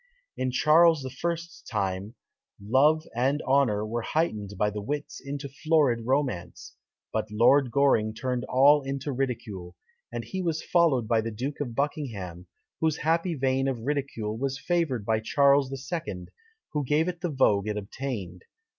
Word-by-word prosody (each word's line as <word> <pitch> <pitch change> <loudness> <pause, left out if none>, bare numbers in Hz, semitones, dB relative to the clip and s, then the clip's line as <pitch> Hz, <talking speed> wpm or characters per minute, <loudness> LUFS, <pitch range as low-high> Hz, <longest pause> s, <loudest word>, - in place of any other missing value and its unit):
In 130 - -1
Charles 155 +2 +4
I.'s 170 +6 -4
time, 100 +1 -2 0.4
love 140 +10 +3
and 135 +5 +1
honour 125 -6 +2
were 115 +2 -2
heightened 110 - -1
by 105 +2 +1
the 105 0 -5
wits 145 +7 -4
into 140 +1 -5
florid 140 -5 +1
romance; 125 -11 -2 0.4
but 110 0 -1
Lord 120 +5 +4
Goring 115 -5 +2
turned 125 +1 -2
all 140 +3 +5
into 135 +1 -4
ridicule; 110 -9 -4 0.4
and - - -4
he 190 - -4
was 165 -3 -1
followed 155 -10 +2
by 115 -1 +2
the 115 - -3
Duke 130 +7 -5
of 125 -5 -4
Buckingham, 105 - -3 0.3
whose 160 -1 +1
happy 165 +2 +1
vein 135 0 +1
of 130 -4 -2
ridicule 130 -5 -2
was 135 0 -1
favoured 155 - 0
by 110 0 +1
Charles 140 +3 +3
II., 135 - -5 0.4
who 150 -1 0
gave 150 +5 +1
it 175 -1 -4
the 175 - -1
vogue 105 -8 +2
it 105 0 -2
obtained. 100 -4 -5
130 Hz, 155 wpm, -27 LUFS, 110-150 Hz, 0.4 s, all